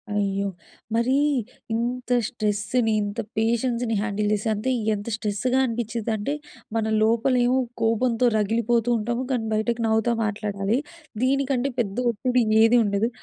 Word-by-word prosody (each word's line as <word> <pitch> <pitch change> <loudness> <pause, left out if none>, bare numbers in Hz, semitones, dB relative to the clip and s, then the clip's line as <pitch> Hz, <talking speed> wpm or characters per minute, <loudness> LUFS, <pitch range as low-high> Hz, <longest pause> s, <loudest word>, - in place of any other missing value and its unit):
అయ్యో! 200 -1 0 0.5
మరి 235 +3 +2 0.6
ఇంత 245 +2 -2 0.2
స్ట్రెస్‌ని 215 0 0
ఇంత 205 +2 -4 0.2
పేషెన్స్‌ని 235 +1 0
హ్యాండిల్ 210 -1 -1
చేసి 210 +1 -1
అంటే 215 +5 -2 0.2
ఎంత 205 +1 -5
స్ట్రెస్‌గ 220 +3 -2
అనిపించిందంటే 230 0 -2 0.4
మన 220 - 0 0.2
లోపల 230 +4 +2
ఏమో 255 +2 +3 0.2
కోపంతో 230 +2 +2
రగిలిపోతూ 230 +2 +1
ఉంటాము. 235 +3 -2
కానీ 240 -3 0
బయటకి 230 +2 0
నవ్వుతా 220 +2 +2
మాట్లాడాలి. 210 +1 -1 0.4
దీనికంటే 275 0 +1
పెద్ద 200 -3 -1
ఒత్తిడి 245 +2 +1 0.2
ఏది 230 +2 +5
ఉండదు. 205 +3 +1
225 Hz, 125 wpm, -24 LUFS, 210-245 Hz, 0.6 s, ఏది